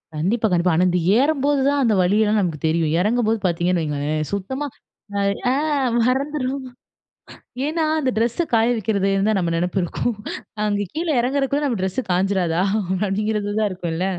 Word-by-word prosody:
கண்டிப்பா, 215 +9 +1
கண்டிப்பா. 175 -1 +2
ஆனா 180 +3 +3
இந்த 180 0 +1 0.2
ஏறும்போது 285 0 +2
தான் 285 0 +2
அந்த 225 -3 +3
வலியெல்லாம் 210 +3 +2
நமக்கு 165 -5 -2
தெரியும். 160 -1 +1
இறங்கும்போது 225 +2 +1
பார்த்தீங்கன்னு 175 0 0
வையுங்களேன்! 150 0 -2
சுத்தமா 265 +9 -3 0.5
அ, - - +1 0.3
ஆ - - +2 0.5
மறந்துருவோம் 265 +1 -1 1.0
ஏன்னா, 320 +3 -1 0.2
அந்த 265 -3 +1
ட்ரெஸ்ஸ 235 +9 +1
காய 230 0 +4
வைக்கிறதுந்தான் 200 -1 +1
நம்ம 170 -2 0
நினைப்பு 180 +2 -1
இருக்கும். 225 +7 -2 0.5
அங்க 205 -1 0
கீழ 330 +2 -3
இறங்குறதுக்குள்ள 275 +3 0
நம்ம 230 -8 -1
ட்ரெஸ்ஸு 190 +7 -1
காய்ஞ்சிராதா! 180 -2 +1 0.5
அப்பிடிங்கிறது 210 +1 -1
தான் 210 - +2
இருக்கும்ல 175 -1 -3
210 Hz, 145 wpm, -21 LUFS, 180-255 Hz, 1.0 s, காய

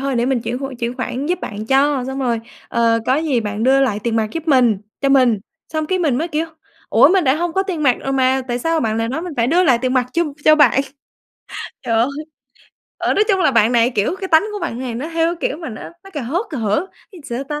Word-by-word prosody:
thôi 275 -1 -1
để 235 +1 +1
mình 260 -3 +1
chuyển 245 +2 -3
hộ, 270 0 -5
chuyển 235 0 -2
khoản 260 +2 -3
giúp 360 +1 -1
bạn 215 +1 -6
cho, 270 0 +2
xong 265 +1 -4
rồi, 240 -4 0 0.3
ờ, 230 -1 +2
có 260 - +3
gì 295 -6 0
bạn 210 0 -4
đưa 270 +1 +4
lại 215 -6 +1
tiền 230 -1 0
mặt 220 -1 +1
giúp 330 0 -5
mình, 245 -7 +4 0.2
cho 275 - +1
mình." 255 -5 +4 0.3
Xong 310 -1 -1
cái 375 +2 0
mình 285 -7 +1
mới, 330 +3 -2
kiểu: 315 +1 -1 0.4
"Ủa? - - +6
mình 370 -2 +3
đã 265 +1 +3
hông 345 0 -2
có 385 - +1
tiền 355 -6 -4
mặt 255 -4 +4
rồi 270 - -3
mà, 265 0 +2
tại 240 0 -1
sao 325 +4 0
bạn 220 -3 -1
lại 225 0 -1
nói 305 +6 -3
mình 355 -3 -6
phải 230 0 +2
đưa 345 +6 +3
lại 245 -6 +4
tiền 255 0 0
mặt 250 -1 +2
cho 340 - +2 0.2
cho 310 - +7
bạn?" 275 -3 +4 1.0
Trời 230 - -1
ơi! 230 +3 +3 0.9
Ở, - - 0
nói 415 - +3
chung 385 -3 +2
là 365 - +4
bạn 230 0 +4
này, 235 +1 +3
kiểu, 215 - -1
cái 380 - -4
tánh 320 +2 +5
của 415 - -4
bạn 235 - -4
này 250 -2 -4
nó, 270 +8 -4
theo 330 +1 +1
cái - - +1
kiểu 285 - -4
mà, 320 - -6
nó 220 - -8 0.2
nó 390 - -12
cà 290 - -4
hớt 340 - -2
cà 290 - -4
hở, 220 - 0 0.2
ý 370 - -13
là - - -15
sao 270 - -4
ta? 295 +2 -4
270 Hz, 275 wpm, -19 LUFS, 235-320 Hz, 1.0 s, cho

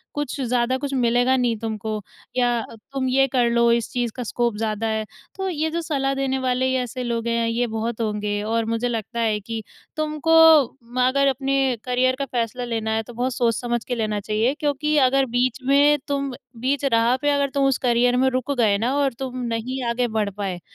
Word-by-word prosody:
कुछ 290 -1 -3
ज़्यादा 250 +1 +1
कुछ 280 0 -4
मिलेगा 245 +1 +3
नहीं 240 -3 +1
तुमको 220 -1 -4 0.4
या 240 -2 +2
तुम 260 +4 -5
ये 270 +1 +4
कर 245 -2 +2
लो 235 0 +3
इस 235 -1 +1
चीज़ 240 -2 -1
का 250 - -4
स्कोप 235 0 -1
ज़्यादा 220 0 -2
है। 220 0 -1 0.3
तो 385 0 -3
ये 320 -1 -1
जो 340 +1 -2
सलाह 275 -4 -1
देने 270 -1 -1
वाले 260 0 0
ऐसे 250 +1 -5
लोग 235 -1 -2
हैं 230 0 +1
ये 235 +2 0
बहुत 225 +1 -3
होंगे 210 -1 -1
और 225 +1 0
मुझे 230 +2 -1
लगता 230 0 -4
है 220 -2 +1
कि 225 +2 -5 0.4
तुमको 310 +1 0 0.6
म 255 - -2
अगर 275 +1 +2
अपने 270 -1 +1
करियर 255 +1 +1
का 275 - -1
फ़ैसला 245 -1 -2
लेना 225 -2 -2
है 220 0 0
तो 240 - -12
बहुत 245 +2 -1
सोच-समझ 240 0 0
के 245 - -1
लेना 215 -2 -1
चाहिए 215 +5 0
क्योंकि 300 0 0
अगर 270 0 +4
बीच 250 +1 +1
में 285 +2 +5
तुम 280 -1 -1 0.3
बीच 275 +2 0
राह 230 +2 +4
पे 290 - +2
अगर 280 -1 +1
तुम 275 -1 +2
उस 270 -2 +2
करियर 245 +1 +3
में 265 +1 +3
रुक 255 +2 -2
गए 210 -4 +3
ना 240 +5 0
और 275 -3 +1
तुम 255 -1 -4
नहीं 240 +3 -3
आगे 240 +1 0
बढ़ 215 -2 -1
पाए 190 -3 -3
245 Hz, 205 wpm, -23 LUFS, 230-270 Hz, 0.6 s, में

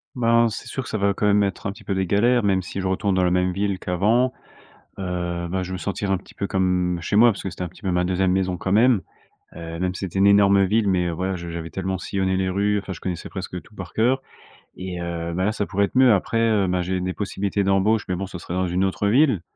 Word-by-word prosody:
Ben, 115 -1 +3
c'est 110 - -6
sûr 135 - -4
que - - -9
ça 110 - -2
va 100 0 +2
quand 105 - -2
même 105 0 +4
être, 95 0 -3
un - - -2
petit 110 +1 -15
peu, 100 - -2
des 95 -1 -1
galères, 120 +5 +3
même 95 -2 +2
si 95 +2 -6
je 95 - -2
retourne 95 +1 0
dans 90 - +2
la 90 - +2
même 90 0 +2
ville 100 0 -1
qu'avant. 110 +8 +1 0.7
Heu, 90 -2 -3
bah, 95 +1 -1
je 90 - -5
vais - - -4
me - - -4
sentir 100 0 -3
un 95 - +3
petit 95 - -13
peu 100 - -3
comme 90 -2 0
chez 95 - -3
moi, 120 +2 +7
parce 100 - -5
que 95 - -4
c'était 90 +1 -7
un 90 - -3
petit 90 +5 -19
peu 95 - -1
ma 90 0 +1
2e 95 0 +1
maison, 95 -1 0
quand 95 +2 -3
même. 115 -1 +4 0.5
Heu, 85 0 -7
même 90 0 -1
si - - -6
c'était 95 0 -3
une 100 - +5
énorme 100 -1 +5
ville, 105 +1 +2
mais 90 -2 +1
voilà, 95 +3 -2
je 85 0 -7
j'avais 85 0 -5
tellement 95 +3 -3
sillonné 95 0 -1
les 95 0 0
rues, 100 +2 +1
enfin, 100 - -8
je 80 - -6
connaissais 90 -2 -5
presque 90 -2 -6
tout 105 - -21
par 90 -3 -8
cœur, 125 +4 +2 0.6
et 90 -1 -5
heu, 85 0 -4
bah, 95 +1 0
là, 105 - +1
ça 105 -2 -2
pourrait 100 +1 +1
être 115 - -4
mieux. 130 -3 +6
Après, 110 +4 -1
heu, 110 -4 +2
bah, 90 0 0
j'ai 90 +1 -1
des 90 0 -2
possibilités 100 0 -2
d'embauche, 100 +3 +2
mais 90 - -1
bon, 95 +1 -4
ce 90 -2 -8
serait 85 - -6
dans 95 0 0
une 90 +2 0
autre 95 +2 -1
ville, 125 - +3
95 Hz, 280 wpm, -23 LUFS, 90-100 Hz, 0.7 s, moi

